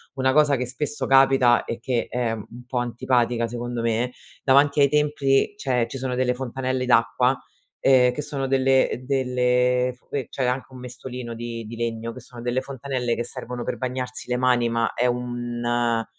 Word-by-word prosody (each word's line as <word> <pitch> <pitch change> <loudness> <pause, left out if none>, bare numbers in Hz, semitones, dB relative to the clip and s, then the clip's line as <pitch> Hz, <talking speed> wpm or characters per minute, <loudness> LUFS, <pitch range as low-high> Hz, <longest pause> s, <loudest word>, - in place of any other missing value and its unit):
una 130 -1 +2
cosa 150 0 +4
che 125 0 -2
spesso 135 +1 -3
capita 135 -3 +5
e 115 - -4
che 120 0 -1
è 120 -2 -1
un 115 +3 -9
po' 125 - -3
antipatica 120 -1 +1
secondo 120 0 -4
me, 115 +2 0 0.3
davanti 140 +2 +4
ai 140 - +6
templi 150 +3 +2
c'è 125 - 0
ci 135 - -6
sono 130 -1 -3
delle 125 0 +1
fontanelle 130 0 -2
d'acqua, 125 +2 +3 0.4
ehm, 125 -2 +5
che 150 - -3
sono 140 -2 -3
delle 130 -1 +2
delle 125 -1 +1
sque 130 +1 -5
c'è 130 - -2
anche 125 +1 -1
un 130 - -10
mestolino 125 -1 -7
di 115 -1 -6
di 115 +2 -8
legno 115 0 -3
che 130 - -9
sono 120 0 -12
delle 125 +1 0
fontanelle 130 -3 -3
che 120 - -2
servono 125 -1 -6
per - - -3
bagnarsi 125 -1 -4
le 125 - +1
mani, 125 -2 +2
ma 115 0 0
è 125 - 0
un 120 -1 -1
125 Hz, 180 wpm, -24 LUFS, 120-130 Hz, 0.4 s, ai